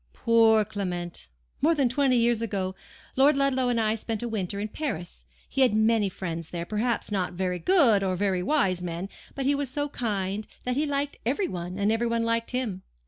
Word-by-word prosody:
"Poor 225 -2 +4
Clement! 180 -5 -4 0.3
More 325 +3 +4
than 275 -4 +3
twenty 255 0 +2
years 235 -1 +2
ago, 195 -4 -2 0.4
Lord 275 +2 +5
Ludlow 260 -2 +2
and 240 -1 +1
I 215 -1 +2
spent 225 0 -3
a - - -1
winter 200 -3 -3
in 210 - -2
Paris. 205 - -5 0.2
He 270 - -1
had 250 -5 +4
many 220 -2 +3
friends 165 -4 -5
there; 170 -1 -4
perhaps 220 +3 -1
not 185 -3 -1
very 180 0 -2
good 275 - +4
or 190 -1 0
very 190 -1 0
wise 185 - +1
men, 175 +2 -4 0.3
but 275 - -2
he 280 - +3
was 280 -2 -1
so 290 +2 -2
kind 205 -5 -2 0.2
that 250 0 -1
he 300 +3 +1
liked 285 0 -2
every 285 - 0
one, 180 +1 -5
and 200 +1 +2
every 230 +1 +1
one 230 0 0
liked 230 0 0
him. 240 -7 -2
225 Hz, 200 wpm, -27 LUFS, 190-255 Hz, 0.4 s, Lord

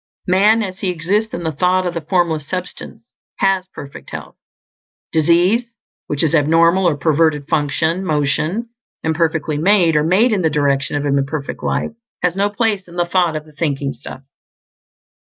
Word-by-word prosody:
Man, 210 +5 +4
as 190 -1 -6
he 195 - -1
exists 190 +6 0
in 170 - -5
the 160 - -1
thought 180 +5 +1
of 175 - -2
the 165 - -3
Formless 160 -2 0
Substance, 180 -1 -5 0.3
has 190 -1 +1
perfect 140 -6 -10
health. - - -8 0.8
Disease, 175 +9 +3 0.4
which 145 +1 +1
is 160 - +1
abnormal 165 +4 +4
or 150 - -2
perverted 155 -1 +1
function 160 +4 0
motion 155 +7 -1 0.3
imperfectly 160 -2 0
made, 175 -2 +3
or 150 - +3
made 195 +10 +3
in 205 -3 +1
the 160 - +2
direction 145 -1 0
of 145 0 -1
imperfect 140 +1 -2
life - - -1 0.3
has 180 -1 +1
no 200 +1 +1
place 205 -2 -1
in 170 - -13
the 175 0 +1
thought 175 -2 +1
of 155 0 -5
the 155 - -17
Thinking 140 -3 -2
Stuff. 130 +2 -11
165 Hz, 165 wpm, -18 LUFS, 150-185 Hz, 0.8 s, Man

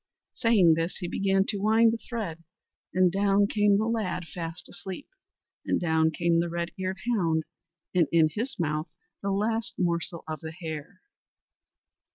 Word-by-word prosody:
Saying 215 -9 +5
this 165 +2 -1
he 180 - -4
began 195 +1 +2
to 205 - -1
wind 225 +2 +5
the - - -1
thread, 200 -11 -5 0.5
and 185 -1 +4
down 200 +1 +3
came 205 -1 +3
the 215 - +1
lad 220 -6 -1
fast 170 +1 -6
asleep; 190 +9 -7 0.6
and - - +1
down 160 -2 +2
came 170 +1 +1
the 170 0 0
red 170 0 -3
eared 190 0 -2 0.2
hound 165 -7 +1 0.5
and 175 -4 +4
in 160 -2 +5
his 235 - -4
mouth 155 -1 -1 0.3
the 200 - -2
last 220 +4 0
morsel 170 -1 -1
of 155 -1 -4
the 160 +2 -7
hare. 160 +1 -7
180 Hz, 160 wpm, -27 LUFS, 165-205 Hz, 0.6 s, Saying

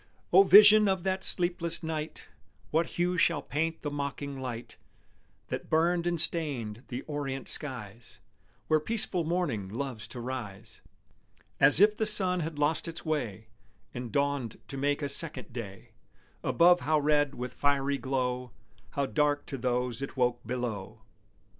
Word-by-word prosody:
_ - - -30 0.3
O 190 - +9
vision 210 +2 +8
of 190 -3 0
that 190 0 -1
sleepless 175 -1 +3
night, 155 -1 -5 0.5
What 160 +1 +1
hue 175 0 0
shall 165 -4 +2
paint 160 +3 -3
the 145 - -3
mocking 140 -1 -5
light 125 -2 -7 0.7
That - - -5
burned 170 +2 +1
and 170 -1 0
stained 135 -10 0
the 125 +2 -6
orient 140 -3 -5
skies 120 -6 -5 0.5
Where 155 - +2
peaceful 185 0 -1
morning 155 - -2
loves 120 0 -5
to 125 - -7
rise, 120 -6 -7 0.8
As 145 +3 +8
if 210 +1 +5
the 220 0 0
sun 185 -4 +3
had 160 -2 -4
lost 150 +3 0
his 165 +1 -7
way 115 -9 -3 0.4
And 120 -2 -6
dawned 140 -3 -1
to - - -7
make 145 +2 -1
a - - 0
second 150 -3 -1
day, 100 -5 -8 0.5
Above 175 +1 +4
how 155 +1 +1
red 145 -1 +1
with 125 +1 -6
fiery 140 -1 0
glow, 125 -2 -2 0.4
How 140 - 0
dark 145 0 0
to 135 - -6
those 125 0 -2
it 140 0 -6
woke 125 -1 0
below! 120 -6 -5
145 Hz, 155 wpm, -29 LUFS, 125-165 Hz, 0.8 s, O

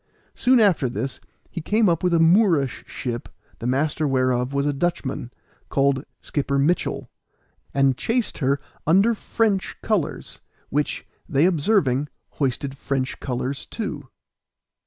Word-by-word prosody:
Soon 255 -1 +4
after 185 - +4
this 130 +2 -4 0.3
he 170 - -4
came 210 +6 +2
up 170 -2 +2
with 180 - +3
a 170 - +4
Moorish 165 - +4
ship, 120 -2 -4 0.3
the 115 - -3
master 145 +4 +1
whereof 130 -1 +1
was 140 0 0
a 145 - +1
Dutchman, 140 -5 -2 0.4
called 135 0 +2 0.2
Schipper 140 -1 -1
Mitchel, 150 +6 +1 0.6
and 135 -1 +3
chased 230 - -1
her 140 -1 +2 0.3
under 195 +8 +5
French 215 -2 0
colors, 210 -9 -1 0.3
which, 145 +2 -1 0.2
they 150 0 +3
observing, 150 - +2 0.2
hoisted 135 0 -2
French 135 -2 -2
colors 130 +1 -3
too. 160 - -5
145 Hz, 130 wpm, -23 LUFS, 135-180 Hz, 0.6 s, under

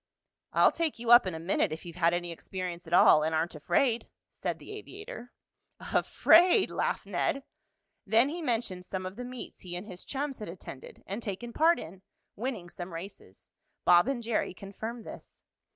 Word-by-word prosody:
"I'll - - +5
take 330 -3 -1
you 235 0 -1
up 240 -5 +9
in 180 - -3
a - - -5
minute 170 -1 +1
if 160 +3 -6
you've 170 -1 -8
had 170 -1 +3
any 175 0 -2
experience 175 0 -6
at 165 - -6
all, 155 -3 +7
and 160 +1 0
aren't 160 +2 0
afraid," 225 - +1 0.2
said - - -3
the - - -11
aviator. 410 - -9 0.5
"Afraid!" 360 +4 +4
laughed - - -1
Ned. 275 - -1 0.6
Then 225 +6 +4
he 340 +3 -5
mentioned 225 - -1
some 185 0 -5
of 185 +1 -6
the 245 - -6
meets 250 0 -8
he 175 -1 -7
and 180 +3 -5
his 185 -4 -9
chums 275 -1 -3
had 210 - -6
attended 170 -6 -10
and 200 +4 -5
taken 230 +3 -5
part 330 +5 +4
in, 180 +4 -9 0.3
winning 225 -6 -4
some 175 +1 -8
races. 95 - -10 0.3
Bob 175 +4 +6
and 265 -3 -1
Jerry 225 -5 -1
confirmed 220 +5 -7
this. - - -12
195 Hz, 185 wpm, -30 LUFS, 175-245 Hz, 0.6 s, up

